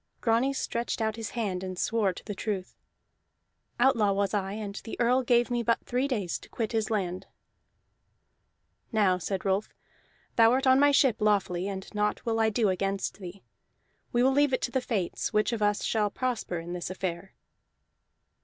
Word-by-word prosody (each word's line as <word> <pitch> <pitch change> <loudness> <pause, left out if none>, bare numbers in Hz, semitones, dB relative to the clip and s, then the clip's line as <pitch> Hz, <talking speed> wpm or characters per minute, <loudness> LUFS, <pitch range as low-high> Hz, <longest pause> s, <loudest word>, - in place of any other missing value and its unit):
Grani 235 +4 +2
stretched 240 -4 -2
out 220 -1 0
his 225 -1 -5
hand 190 -5 -1
and 185 -1 -5
swore 215 -2 +1
to 180 - -11
the 205 - -4
truth. 195 -2 -4 1.0
"Outlaw 235 -5 +4
was 200 +1 0
I, 195 -1 -1
and 210 -1 -5
the 225 - -7
Earl 250 +2 +3
gave 240 -1 +2
me 240 -1 +1
but 230 0 0
three 250 +3 0
days 205 - -2
to - - -15
quit 225 -3 -3
his 220 -2 0
land." 185 -5 -2 1.6
"Now," 200 -5 +3
said 190 +2 -3
Rolf, 195 +2 +1 0.7
"thou 230 0 +6
art 265 +1 +1
on 260 0 +6
my 290 +1 +6
ship 270 -5 +4
lawfully, 200 -4 +1
and 190 -1 -5
naught 210 +2 -1
will 225 -1 0
I 220 0 +4
do 215 -1 +1
against 195 +2 -2
thee. 190 0 -9 0.7
We 240 0 +2
will 265 - +5
leave 285 -1 +3
it 255 - +1
to 240 - -1
the 260 - 0
fates, 210 -8 -2
which 215 +3 +2
of 225 - -3
us 205 0 +1
shall 210 -2 +1
prosper 235 -6 -2
in 170 +1 -6
this 175 -1 -4
affair." 185 0 -5
215 Hz, 180 wpm, -28 LUFS, 195-240 Hz, 1.6 s, thou